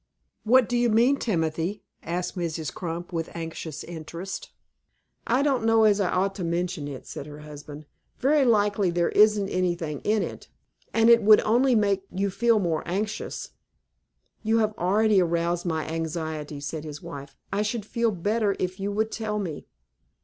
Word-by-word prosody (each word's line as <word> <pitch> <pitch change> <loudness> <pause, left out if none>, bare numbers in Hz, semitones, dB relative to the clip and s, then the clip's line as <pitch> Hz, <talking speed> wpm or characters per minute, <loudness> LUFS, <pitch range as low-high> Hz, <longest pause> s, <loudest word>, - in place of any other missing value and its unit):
"What 245 +1 +5
do 245 - -1
you 240 0 +3
mean, 240 +6 +4
Timothy?" 170 - -1 0.2
asked 175 +3 -3
Mrs. 165 -3 -3
Crump, 175 0 -5
with 165 -1 -2
anxious 165 -2 -6
interest. 170 +3 -7 0.8
"I 250 +4 +3
don't 270 -5 +1
know 225 0 +4
as 210 -1 +4
I 195 - +1
ought 195 +2 +1
to 185 - -3
mention 170 -2 -2
it," 140 -3 -8
said 140 - -7
her 150 0 -10
husband. 150 0 -10 0.3
"Very 285 +2 +3
likely 205 -5 +3
there 170 0 +1
isn't 210 -1 +4
anything 175 -5 -1
in 215 0 +2
it, - - -7 0.4
and 225 0 +3
it 235 0 +7
would 215 0 +7
only 245 +3 +3
make 200 -3 +2
you 195 +1 -1
feel 230 +3 +3
more 170 -6 0
anxious." 205 +4 -3 0.9
"You 220 +1 +2
have 215 -1 +2
already 205 +2 +3
aroused 170 +1 0
my 160 -2 -1
anxiety," 160 -2 -4
said 150 +2 -5
his 150 0 -8
wife. 140 -5 -9 0.2
"I 200 - +1
should 215 0 -2
feel 235 +1 0
better 205 +2 0
if 185 +1 -3
you 200 +1 -2
would 220 +2 0
tell 215 -2 -3
me." 175 -8 -5
190 Hz, 170 wpm, -26 LUFS, 165-215 Hz, 0.9 s, it